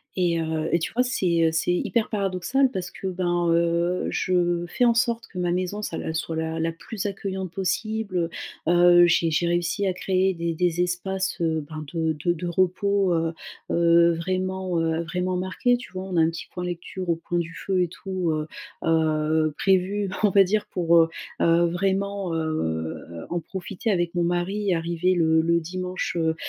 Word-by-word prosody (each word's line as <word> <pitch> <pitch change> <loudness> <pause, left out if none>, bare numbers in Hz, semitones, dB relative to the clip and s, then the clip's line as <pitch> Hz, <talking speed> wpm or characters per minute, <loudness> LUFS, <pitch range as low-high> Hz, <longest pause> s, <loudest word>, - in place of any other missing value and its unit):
et, 175 -2 +1
heu, 160 -1 -2
et 170 - +4
tu 165 - -4
vois, 245 - +2
c'est, 180 -10 +2
heu, - - +1
c'est 165 +2 +1
hyper 220 +5 0
paradoxal 205 +6 +1
parce 185 -4 -4
que, 190 - -6
ben, 175 -1 0
heu, 170 +1 +1
je 175 -1 +1
fais 245 - +1
en 235 - +5
sorte 230 0 0
que 180 - -8
ma 175 -1 0
maison 185 +3 -2
ça 170 - -4
l - - -5
elle 160 - -2
soit 165 0 -3
la 160 0 -2
la 165 +1 0
plus 200 +5 -5
accueillante 190 -2 -4
possible, 195 -2 -1 0.4
heu. - - +4
Heu, 175 0 +7
j'ai 165 -1 +2
j'ai 170 +3 +1
réussi 175 +3 0
à 185 - +1
créer 185 0 +1
des 170 0 -2
des 175 +1 +1
espaces, 190 +2 -1
heu, 160 -2 0
ben, 155 -1 -6
de 160 -2 0
de 175 - +3
de 175 +1 -6
repos, 185 +2 +1
heu, 165 0 0 0.4
heu, 170 0 +5
vraiment, 185 +1 -2
heu, 165 0 0
vraiment 180 +2 -2
marqués 190 +7 +1
tu 245 - -11
vois? 185 0 -4
On 190 -2 -5
a - - +5
un 160 - +4
petit 165 - -6
point 180 - -4
lecture 175 +1 -5
au 170 - +3
coin 175 +1 -2
du 165 -1 -4
feu 190 -2 0
et 180 - +2
tout, 185 0 -3
heu, 155 0 -2 0.4
heu, 155 -1 +2
prévu 195 +1 +1
on 210 - +5
va 195 +1 +6
dire 210 +3 0
pour, 170 -2 +1
heu, 165 0 +5 0.3
heu, 170 +1 +4
vraiment, 195 0 -1
heu, - - 0 0.7
heu, 85 -1 -8
en 175 - 0
profiter 185 +5 -5
avec 175 -4 +1
mon 175 - +1
mari 175 +1 +1 0.3
arrivé 170 +2 0
le 160 -1 +3
le 170 +1 +2
dimanche, 180 +2 -4
heu, 160 -1 +1
175 Hz, 200 wpm, -25 LUFS, 165-190 Hz, 0.7 s, Heu